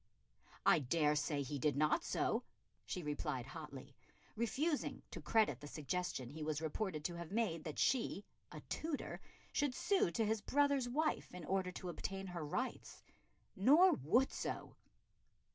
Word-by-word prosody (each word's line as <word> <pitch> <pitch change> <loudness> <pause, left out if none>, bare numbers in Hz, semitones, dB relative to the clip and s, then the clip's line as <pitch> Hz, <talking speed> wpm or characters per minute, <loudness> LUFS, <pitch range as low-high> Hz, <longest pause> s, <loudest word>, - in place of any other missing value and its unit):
"I 170 - +6
dare 150 +2 +2
say 150 -1 0
he 140 +2 -4
did 145 +1 +2
not 150 +1 +3
so," - - +1 0.5
she 175 +11 -3
replied 145 -4 -2
hotly, 140 -2 -9 0.4
refusing 275 +8 0
to - - -6
credit 220 -1 +3
the 145 - -8
suggestion 150 -4 -3
he 155 +2 -7
was 155 -1 -1
reported 160 0 -2
to 175 - -1
have 170 0 -7
made 200 -8 0
that 155 - -5
she, 230 -5 +1 0.3
a - - -8
Tudor, 315 -3 -3 0.3
should 285 -4 +1
sue 395 - +3
to 215 +6 0
his 220 0 +1
brother's 280 0 +2
wife 310 +5 0
in 180 -3 -7
order 190 0 0
to 180 - -5
obtain 195 +3 -4
her 175 -3 -4
rights, 250 - -3 0.5
"nor 300 - +7
would 240 - +3
so." - - -4
180 Hz, 155 wpm, -38 LUFS, 150-235 Hz, 0.5 s, nor